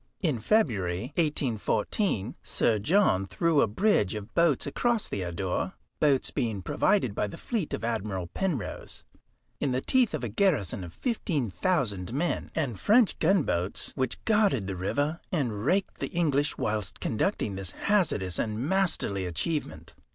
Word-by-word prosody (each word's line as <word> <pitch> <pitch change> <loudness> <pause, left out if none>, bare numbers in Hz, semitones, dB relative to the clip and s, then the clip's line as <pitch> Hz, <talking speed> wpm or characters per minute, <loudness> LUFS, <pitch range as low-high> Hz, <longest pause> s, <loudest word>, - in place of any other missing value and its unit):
In 155 - 0
February, 110 - +1
1814, 130 - 0
Sir 110 -2 +1
John 110 - +3
threw 150 - +2
a - - +4
bridge 110 - +2
of 105 +1 -7
boats 170 -6 +3
across 230 - 0
the 100 - -3
Adour, 90 +1 -2 0.3
boats 140 -3 +2
being 110 -8 -2
provided 130 - +2
by 105 - -1
the - - -8
fleet 215 -10 -3
of - - -3
Admiral 105 -5 -2
Penrose, 155 - -4 0.6
in 135 -3 0
the 130 - +1
teeth 245 - +2
of 145 - -5
a - - 0
garrison 110 - +1
of 85 - -8
15,000 140 - -1
men, 165 +6 -1
and 130 - -1
French 220 0 +4
gunboats 145 - +1
which 130 -2 -2
guarded 205 - +3
the 95 -1 -3
river 145 - -1
and 120 - -1
raked 195 +3 +1
the - - -2
English 145 -5 +1
whilst 105 -3 -2
conducting 110 - -1
this 95 -1 -5
hazardous 130 - 0
and 110 -1 -1
masterly 140 - +1
achievement. 115 - -3
130 Hz, 145 wpm, -28 LUFS, -, 0.6 s, a